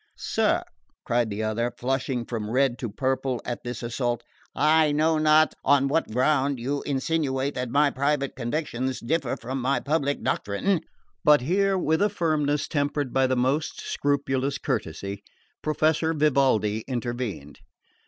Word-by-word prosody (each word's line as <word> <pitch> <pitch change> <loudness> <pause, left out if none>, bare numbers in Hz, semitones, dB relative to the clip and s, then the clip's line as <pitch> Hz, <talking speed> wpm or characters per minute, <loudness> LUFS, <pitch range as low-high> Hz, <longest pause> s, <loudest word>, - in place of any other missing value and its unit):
"Sir," - - +1 0.4
cried 120 -1 +1
the 105 +1 -3
other, 110 +2 0
flushing 130 -1 -1
from 110 -3 -4
red 130 0 +1
to 120 - -3
purple 130 +1 -1
at 120 - -4
this 120 0 -5
assault, 120 -1 -2 0.3
"I 155 0 +4
know 155 +2 +2
not 155 -1 +4
on 140 0 +4
what 165 +4 +1
ground 135 +3 +1
you 140 +4 -2
insinuate 140 -1 0
that 125 -1 -3
my 145 +3 +3
private 140 0 0
convictions 130 0 -2
differ 140 0 -1
from 130 +3 -4
my 130 +1 +1
public 145 0 -1
doctrine 165 - 0 0.2
" - - -45
But 150 -2 +6
here, 195 +7 +2
with 160 -1 +1
a 205 - +4
firmness 155 -6 0
tempered 145 -2 -1
by 135 0 +3
the 130 - +1
most 135 +5 0
scrupulous 140 -1 -1
courtesy, 100 - -3 0.4
Professor 155 +1 +1
Vivaldi 130 -8 +2
intervened. 120 - -4
135 Hz, 145 wpm, -25 LUFS, 120-150 Hz, 0.4 s, But